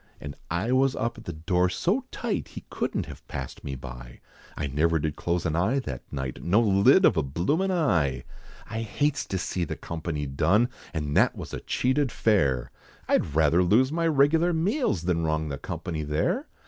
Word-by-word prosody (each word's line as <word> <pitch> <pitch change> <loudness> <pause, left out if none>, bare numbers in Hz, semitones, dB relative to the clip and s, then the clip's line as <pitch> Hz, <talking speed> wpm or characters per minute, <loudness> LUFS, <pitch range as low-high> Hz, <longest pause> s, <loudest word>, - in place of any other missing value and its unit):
And 70 0 -7
I 95 +8 -1
was 130 +1 +3
up 115 0 -2
at - - -14
the 85 - -4
door 90 +3 +1
so 205 - 0
tight, 235 -4 -3
He - - -7
couldn't - - -2
have - - -12
passed 65 -1 -6
me 70 - -4
by, - - -10 0.4
I - - -2
never 80 +4 +1
did 75 -1 -2
close 85 +1 -1
an 80 -2 0
eye 95 +11 +2
that 65 - -5
night, 65 -2 -4
No 95 +6 +3
lid 115 - +5
of - - +4
a - - +4
bloomin' 90 - 0
eye! 85 - +1 0.4
I 110 +1 -4
hates 145 +6 -1
to 95 - -2
see 90 0 -2
the 85 - -3
company 80 -3 -4
done, 85 - +2 0.2
And 75 -3 -3
that - - +4
was - - -8
a - - -3
cheated 130 0 0
fare, 70 - +1 0.4
I'd 75 - +1
rather 80 +2 +4
lose 115 +10 +3
my 165 +1 +1
regular 160 +3 +3
meals, 170 - 0
Than 85 -2 0
wrong 80 -1 -1
the 70 -1 -5
company, 80 -3 -4
there! 75 - -1
90 Hz, 190 wpm, -26 LUFS, -, 0.4 s, lid